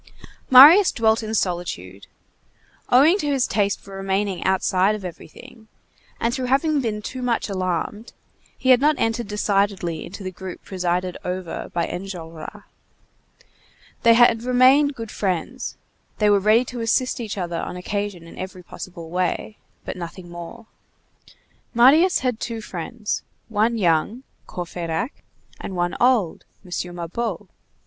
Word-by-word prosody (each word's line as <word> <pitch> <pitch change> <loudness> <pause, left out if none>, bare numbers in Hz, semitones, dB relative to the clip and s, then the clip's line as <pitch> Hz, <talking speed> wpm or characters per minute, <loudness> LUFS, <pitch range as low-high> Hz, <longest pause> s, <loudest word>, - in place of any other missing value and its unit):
Marius 300 +10 +9
dwelt 220 -1 +2
in 220 0 -3
solitude. 170 - -3 0.8
Owing 300 +10 +5
to 295 - -2
his 275 -3 +2
taste 200 -1 0
for 195 0 -12
remaining 195 0 -1
outside 190 +1 +2
of 205 -3 -8
everything, 200 +6 -11 0.5
and 230 +1 0
through 255 -1 -2
having 280 +3 +2
been 210 -3 -3
too 255 +3 -6
much 240 -3 -1
alarmed, 185 +4 -3 0.5
he 260 - -1
had 255 0 +6
not 300 +1 +4
entered 225 0 -1
decidedly 200 -5 0
into 195 +3 -9
the 185 - -4
group 185 0 -9
presided 180 -1 -2
over 180 -1 -5
by 170 -1 0
Enjolras. 180 +1 -7 1.4
They 230 0 +6
had 235 -1 +5
remained 260 +4 +4
good 225 -3 -7
friends; 195 +6 -3 0.4
they 210 -1 +3
were 200 - +5
ready 215 +5 +4
to 245 -1 -6
assist 250 +3 +1
each 220 -4 -5
other 175 -3 -3
on 180 - -5
occasion 200 -1 -4
in 165 - -12
every 185 -1 -7
possible 170 -2 -9
way; 185 +4 -2 0.3
but - - -5
nothing 175 0 -8
more. 175 +7 -9 1.1
Marius 300 +10 +5
had 250 -3 -1
two 230 -2 -4
friends: 210 +3 -4 0.3
one 225 +2 +1
young, 190 +6 +1 0.2
Courfeyrac; 175 - -4 0.4
and 190 - -6
one 175 0 -1
old, 240 -9 +2 0.2
M. 175 0 -5
Mabeuf. 175 +7 -4
205 Hz, 140 wpm, -22 LUFS, 180-240 Hz, 1.4 s, Marius